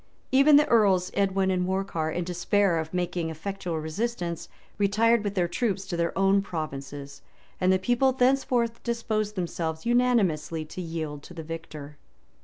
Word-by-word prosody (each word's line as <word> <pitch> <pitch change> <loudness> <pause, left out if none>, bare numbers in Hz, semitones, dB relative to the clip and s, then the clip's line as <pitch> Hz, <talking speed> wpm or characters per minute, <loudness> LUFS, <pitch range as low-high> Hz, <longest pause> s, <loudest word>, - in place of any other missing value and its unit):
Even 275 +3 +6
the 295 +1 +6
Earls 195 -6 +3
Edwin 195 -1 +1
and 180 -1 +1
Morcar, 185 -4 -1
in 175 +2 -2
despair 180 +1 +1
of 160 0 -5
making 175 -2 -2
effectual 170 0 -4
resistance, 170 +1 -3 0.3
retired 215 +3 +3
with 205 -1 -3
their 180 -2 +2
troops 195 0 -1
to 190 -2 -4
their 170 0 0
own 195 +1 +4
provinces; 140 -5 -6 0.4
and 185 0 +3
the 190 - +4
people 245 +7 +2
thenceforth 250 -2 +1
disposed 215 -3 -2
themselves 165 -3 -3
unanimously 205 -11 +1
to 170 +4 -7
yield 160 -4 -5
to 175 - -13
the 165 - -6
victor. 155 -3 -8
185 Hz, 155 wpm, -27 LUFS, 165-215 Hz, 0.4 s, Even